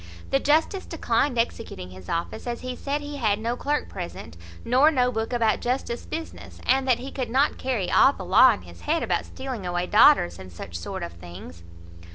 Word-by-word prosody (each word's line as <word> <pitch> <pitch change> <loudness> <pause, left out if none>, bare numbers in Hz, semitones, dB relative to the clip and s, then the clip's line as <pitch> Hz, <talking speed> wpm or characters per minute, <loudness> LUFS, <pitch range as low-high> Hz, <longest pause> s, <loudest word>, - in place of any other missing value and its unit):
The 270 - +3
justice 315 +7 +1
declined 265 -4 0
executing 220 - -3
his 95 -1 -12
office, 170 +8 -3
as 235 -1 -3
he 255 0 -5
said 285 +3 -3
he 290 0 -6
had 215 -6 +1
no 230 +3 -2
clerk 295 +4 -1
present, 170 - -8 0.3
nor 260 +6 +5
no 250 -5 +2
book 225 0 -3
about 230 -3 +2
justice 245 -1 -2
business; 325 0 -7
and 265 +1 +2
that 250 -3 +4
he 265 +2 -7
could 255 -3 -4
not 270 +5 +2
carry 245 -8 -1
all 270 - +6
the - - -9
law - - +7
in - - -4
his - - -14
head 325 +2 0
about - - -1
stealing 260 -6 -6
away 175 0 -1
daughters, 210 - +5
and 95 -1 -10
such 85 0 -9
sort 85 -1 -5
of 85 - -6
things. 85 0 -11
240 Hz, 200 wpm, -25 LUFS, 175-270 Hz, 0.3 s, law